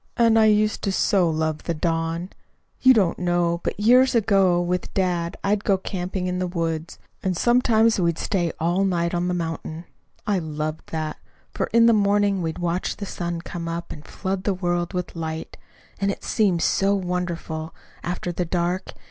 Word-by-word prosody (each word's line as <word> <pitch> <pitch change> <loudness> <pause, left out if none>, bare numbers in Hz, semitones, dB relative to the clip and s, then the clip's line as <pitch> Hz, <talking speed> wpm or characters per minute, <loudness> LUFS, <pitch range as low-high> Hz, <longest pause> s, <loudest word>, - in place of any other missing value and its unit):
And 230 -2 +5
I 220 - +6
used 215 0 +3
to 195 - +1
so 190 -2 +2
love 155 -1 -1
the 170 - -1
dawn! 165 +2 -1 0.5
You 260 - +7
don't 200 -9 +3
know, 175 -1 +1
but - - -3
years 250 +4 +5
ago, 195 -5 +3
with 175 0 -2
dad, 175 -3 0
I'd 205 +1 +1
go 195 - +3
camping 185 0 -4
in 180 0 -1
the 185 - -1
woods, 165 -2 -3 0.2
and 185 -2 -1
sometimes 230 -2 +3
we'd 170 -2 +1
stay 175 -5 0
all 175 +4 +1
night 170 -3 0
on 175 0 0
the 180 - 0
mountain. 165 0 -4 0.4
I 205 -3 +1
loved 155 -1 -4
that, 155 -1 -3 0.4
for - - -1
in 230 0 +4
the 230 - +6
morning 200 -2 +2
we'd 160 -1 -3
watch 175 +1 -2
the 200 - -5
sun 170 -3 -4
come 170 0 -6
up 170 +1 -4
and 150 - -8
flood 190 +2 -4
the 200 -2 0
world 175 -1 -1
with 180 -1 -4
light. 160 -1 -5 0.4
And 195 0 +1
it 200 - -4
seemed 195 -6 +1
so 195 +1 +2
wonderful, 175 -4 -3 0.3
after 175 0 -3
the 175 +1 -2
dark! 175 +2 -2
180 Hz, 180 wpm, -23 LUFS, 170-195 Hz, 0.5 s, You